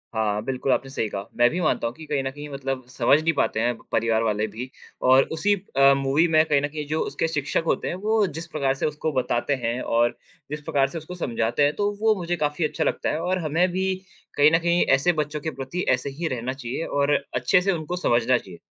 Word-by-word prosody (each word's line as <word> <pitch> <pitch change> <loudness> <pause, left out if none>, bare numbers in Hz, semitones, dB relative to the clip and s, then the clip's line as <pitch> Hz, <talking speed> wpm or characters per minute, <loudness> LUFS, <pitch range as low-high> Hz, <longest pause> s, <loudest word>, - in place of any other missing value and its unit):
हाँ, 105 -1 0
बिल्कुल 135 0 -1
आपने 135 - 0
सही 115 -5 -2
कहा। 100 0 -5
मैं 120 0 +5
भी 180 - -3
मानता 135 -7 +1
हूँ 115 - -5
कि 160 - -10
कहीं 145 -2 -1
न 135 - -2
कहीं 145 +1 -8
मतलब 135 -2 -4
समझ 130 +3 +3
नहीं 165 +1 +1
पाते 110 - +1
हैं 120 +1 +1 0.2
परिवार 115 0 +1
वाले 105 -1 0
भी 125 +3 -7 0.4
और 130 +1 +7
उसी 205 +6 +2 0.2
अ, 140 0 +7
मूवी 140 +5 +2
में 155 -1 +5
कहीं 145 -3 +2
न 145 - 0
कहीं 150 0 -6
जो 155 +1 -1
उसके 165 - -1
शिक्षक 155 0 -1
होते - - 0
हैं - - -2
वो 220 -2 +3
जिस 165 +1 -7
प्रकार 135 -3 +1
से - - -2
उसको 150 +1 -2
बताते 130 +2 0
हैं 120 +2 -1
और 120 +1 +1 0.3
जिस 150 0 -4
प्रकार 140 -2 +1
से 165 - -7
उसको 165 +3 -8
समझाते 120 -3 0
हैं, 145 +1 +3
तो 205 0 0
वो 220 -1 +4
मुझे 175 -1 -2
काफ़ी 150 0 -1
अच्छा 150 - -1
लगता - - -1
है। 155 - -1
और 185 +1 0
हमें 165 +5 +2
भी 190 +1 0 0.4
कहीं 150 +2 +6
न 165 - +4
कहीं 170 +1 +2
ऐसे 170 +6 +2
बच्चों 150 -1 -2
के 160 - -3
प्रति 135 +7 -3
ऐसे 130 +2 +1
ही 160 +5 -4
रहना 125 -1 -3
चाहिए 135 +3 -4
और 145 +1 +1 0.2
अच्छे 125 +8 +3
से 195 +2 +1
उनको 165 0 -3
समझना 120 +1 +3
चाहिए। 90 -6 -11
145 Hz, 240 wpm, -24 LUFS, 125-165 Hz, 0.4 s, और